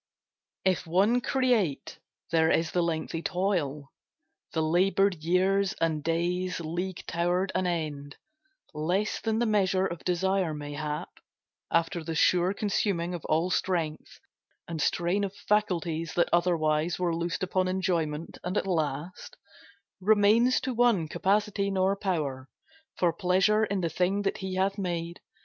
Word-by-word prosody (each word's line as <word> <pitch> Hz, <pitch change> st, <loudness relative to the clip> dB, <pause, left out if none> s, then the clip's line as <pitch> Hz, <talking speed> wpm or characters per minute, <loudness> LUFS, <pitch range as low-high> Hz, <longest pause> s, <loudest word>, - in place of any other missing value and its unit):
If 185 Hz, -3 st, +1 dB
one 200 Hz, +9 st, +3 dB
create, 235 Hz, -, 0 dB, 0.3 s
there 160 Hz, -1 st, +3 dB
is 165 Hz, 0 st, +1 dB
the 180 Hz, -, +1 dB
lengthy 165 Hz, -1 st, -2 dB
toil; 170 Hz, -7 st, -1 dB, 0.6 s
The 160 Hz, -, 0 dB
laboured 180 Hz, +1 st, +2 dB
years 190 Hz, +3 st, +2 dB
and 160 Hz, -2 st, -1 dB
days 175 Hz, +3 st, -1 dB
league 175 Hz, +3 st, -4 dB
tow'rd 175 Hz, +3 st, 0 dB
an 185 Hz, 0 st, 0 dB
end 150 Hz, -4 st, -3 dB, 0.6 s
Less 175 Hz, +8 st, -1 dB
than 220 Hz, -1 st, 0 dB
the 240 Hz, -, +2 dB
measure 190 Hz, -3 st, +2 dB
of 170 Hz, -3 st, -5 dB
desire, 185 Hz, -2 st, 0 dB
mayhap, 150 Hz, 0 st, -5 dB, 0.5 s
After 170 Hz, +1 st, +1 dB
the 165 Hz, 0 st, -4 dB
sure 180 Hz, +3 st, +3 dB
consuming 195 Hz, -4 st, -1 dB
of 175 Hz, -, -5 dB
all 165 Hz, +4 st, +1 dB
strength, 165 Hz, -5 st, -2 dB, 0.5 s
And 165 Hz, -2 st, -4 dB
strain 175 Hz, +6 st, +1 dB
of 200 Hz, 0 st, -3 dB
faculties 175 Hz, -6 st, -1 dB
that 170 Hz, -, +2 dB
otherwhere 165 Hz, -2 st, +2 dB
Were 175 Hz, -2 st, 0 dB
loosed 170 Hz, +2 st, -2 dB
upon 185 Hz, 0 st, 0 dB
enjoyment; 170 Hz, -4 st, -2 dB
and 180 Hz, +3 st, -2 dB
at -, -, 0 dB
last 160 Hz, -1 st, -3 dB, 0.6 s
Remains 215 Hz, +5 st, +4 dB
to 260 Hz, -, -2 dB
one 235 Hz, -9 st, +3 dB
capacity 200 Hz, +2 st, 0 dB
nor 190 Hz, 0 st, +1 dB
power 150 Hz, -10 st, -3 dB, 0.5 s
For 175 Hz, -2 st, +2 dB
pleasure 195 Hz, +4 st, +2 dB
in 200 Hz, -2 st, -2 dB
the 170 Hz, -, 0 dB
thing 185 Hz, +5 st, 0 dB
that 195 Hz, -, -1 dB
he 190 Hz, -2 st, -4 dB
hath 195 Hz, +2 st, 0 dB
made. 170 Hz, -2 st, -3 dB
180 Hz, 140 wpm, -28 LUFS, 165-195 Hz, 0.6 s, Remains